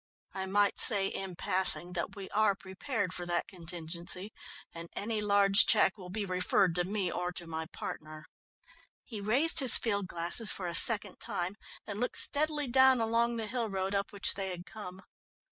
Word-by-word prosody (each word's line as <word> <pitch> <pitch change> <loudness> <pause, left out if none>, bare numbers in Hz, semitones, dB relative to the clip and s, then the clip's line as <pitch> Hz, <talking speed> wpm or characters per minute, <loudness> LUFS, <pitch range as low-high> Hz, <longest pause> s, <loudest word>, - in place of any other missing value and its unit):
I 190 0 -5
might 200 +1 +1
say 205 -5 +1
in 190 -2 -6
passing 180 0 +1
that 170 - -4
we 195 -2 -8
are 210 -2 +2
prepared 190 +1 -4
for 175 -1 -6
that 175 0 -1
contingency, 175 +2 -4 0.4
and 170 0 -9
any 215 +1 -3
large 200 0 +3
cheque 210 -3 +4
will 185 -4 -11
be 205 +2 -4
referred 185 0 +1
to 175 +1 +1
me 190 -1 -3
or 180 0 -3
to 175 - -6
my 160 -1 -6
partner." 155 -1 -8 0.8
He 215 -4 -8
raised 275 +11 +5
his 260 -5 +8
field 200 -4 -2
glasses 175 +6 +4
for 185 - -3
a 170 - -3
second 205 +1 +4
time 175 +2 -3 0.3
and 205 0 -6
looked 250 - -2
steadily 300 -1 0
down 260 0 +4
along 230 +1 0
the 225 - -3
hill 230 0 -3
road 195 0 -3
up 200 0 -2
which 200 -2 -2
they 195 -1 -5
had 180 -1 -7
come. 190 -3 -10
195 Hz, 180 wpm, -30 LUFS, 180-220 Hz, 0.8 s, his